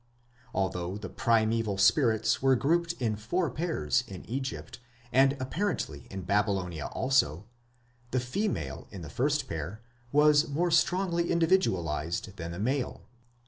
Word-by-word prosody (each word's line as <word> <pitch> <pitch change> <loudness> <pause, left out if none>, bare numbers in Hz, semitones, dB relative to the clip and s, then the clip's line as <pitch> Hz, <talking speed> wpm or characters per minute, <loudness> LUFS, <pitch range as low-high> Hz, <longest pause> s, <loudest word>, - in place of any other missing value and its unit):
Although 90 0 -1
the 100 -3 -7
primeval 115 -3 +1
spirits 110 - +3
were 135 0 +4
grouped 170 +6 +1
in 115 -9 -1
four 145 - -1
pairs 125 - 0
in 95 -2 -9
Egypt, 130 0 -5 0.3
and 135 +2 +4
apparently 130 - -3
in 95 0 -5
Babylonia 95 -5 0
also, 115 - +1 0.6
the 130 - 0
female 125 - -3
in 95 -4 -8
the 75 - -8
first 140 - 0
pair 85 +7 -5 0.3
was 150 +1 +5
more 170 +5 0
strongly 170 +1 +2
individualized 95 - +1
than 85 0 -5
the 85 - -6
male. 125 +6 -2
115 Hz, 130 wpm, -29 LUFS, 95-150 Hz, 0.6 s, was